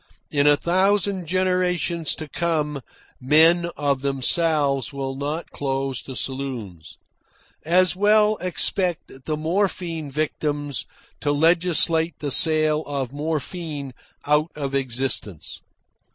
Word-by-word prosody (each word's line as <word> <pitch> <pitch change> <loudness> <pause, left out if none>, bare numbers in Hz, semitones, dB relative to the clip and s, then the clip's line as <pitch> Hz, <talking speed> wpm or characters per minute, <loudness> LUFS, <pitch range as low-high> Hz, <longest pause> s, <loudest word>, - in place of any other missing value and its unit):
In 145 0 +2
a 145 0 +6
thousand 190 +1 +1
generations 180 -2 0
to 155 - -7
come 150 -3 -1 0.4
men 160 +6 +4
of 140 -2 0
themselves 140 0 +1
will 135 -1 -4
not 145 +4 -4
close 135 -1 -2
the 130 - -9
saloons. 120 - -5 0.7
As 180 +3 +3
well 210 +2 +4
expect 180 0 -1
the 155 -1 -1
morphine 165 -2 -1
victims 145 -1 -2 0.3
to 145 - 0
legislate 165 0 +2
the 145 -2 -4
sale 155 +1 +3
of 135 -3 -3
morphine 150 -1 -4 0.3
out 150 +2 +2
of 140 -2 -4
existence. 130 - -2
150 Hz, 110 wpm, -23 LUFS, 140-170 Hz, 0.7 s, a